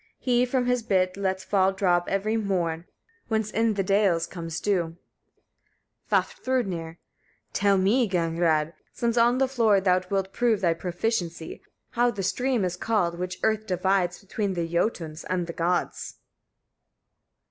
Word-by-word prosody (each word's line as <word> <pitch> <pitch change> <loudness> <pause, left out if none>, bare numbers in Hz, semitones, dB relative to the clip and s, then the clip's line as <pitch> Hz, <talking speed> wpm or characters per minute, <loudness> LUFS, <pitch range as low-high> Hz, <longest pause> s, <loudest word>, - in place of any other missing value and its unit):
He 250 -1 +2
from 250 0 0
his 250 0 +1
bit 185 -4 +1
lets 190 -1 -2
fall 190 -1 +2
drops 180 -3 +1
every 200 +3 0
morn, 175 -6 -1 0.4
whence 220 -1 -1
in 225 -1 +1
the 195 - 0
dales 190 -4 +2
comes 165 -2 -6
dew. 175 -5 -1 1.1
Vafthrûdnir. 200 - -1 0.5
15. - - -42
Tell 200 -1 +3
me, 210 +5 +2
Gagnrâd! 165 -3 +1 0.2
since 235 -1 -1
on 240 +1 +4
the 265 0 +2
floor 230 -6 +3
thou 185 -1 +2
wilt 195 -1 -1
prove 230 -4 +1
thy 170 -3 +3
proficiency, 175 -1 -3 0.3
how 240 0 +2
the 205 -5 -4
stream 245 +2 0
is 180 -1 -2
called, 180 -4 0
which 180 0 -4
earth 220 0 +1
divides 180 -1 +1
between 200 -1 -3
the 170 -1 -1
Jötuns 165 -3 -2
and 180 -1 0
the 170 - -6
Gods? 175 +1 -2
195 Hz, 145 wpm, -26 LUFS, 175-220 Hz, 1.1 s, on